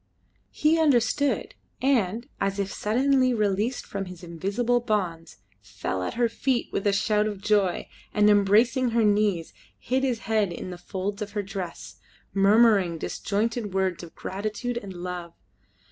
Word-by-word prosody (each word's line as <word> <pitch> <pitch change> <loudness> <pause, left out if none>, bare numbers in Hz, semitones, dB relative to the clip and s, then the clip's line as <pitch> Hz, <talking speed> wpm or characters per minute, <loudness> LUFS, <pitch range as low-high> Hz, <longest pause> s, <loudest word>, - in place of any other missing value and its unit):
He 315 +2 +2
understood, 285 -1 +2 0.3
and, 235 -4 +1
as 195 0 -1
if 195 -1 -2
suddenly 255 +3 +2
released 210 +3 0
from 195 -1 -4
his 180 -1 -10
invisible 200 +8 0
bonds, 185 -8 -2 0.2
fell 95 0 -4
at 90 - -3
her 240 0 +3
feet 245 +2 -1
with 195 - -1
a - - +4
shout 210 +1 +2
of 205 -2 -4
joy, 200 -3 +1 0.2
and, 210 0 +3
embracing 215 +5 +4
her 230 - +4
knees, 205 -5 +1 0.2
hid 260 +2 -1
his 250 -4 0
head 215 -4 +1
in 175 +2 -6
the 175 - -8
folds 195 +3 -4
of 205 0 -5
her 205 -1 -1
dress, 190 -3 -7 0.4
murmuring 200 -3 +4
disjointed 210 +3 -2
words 190 -2 0
of 170 -2 -11
gratitude 215 +5 -4
and 200 -4 -9
love. 175 -1 -6
205 Hz, 150 wpm, -26 LUFS, 190-235 Hz, 0.4 s, a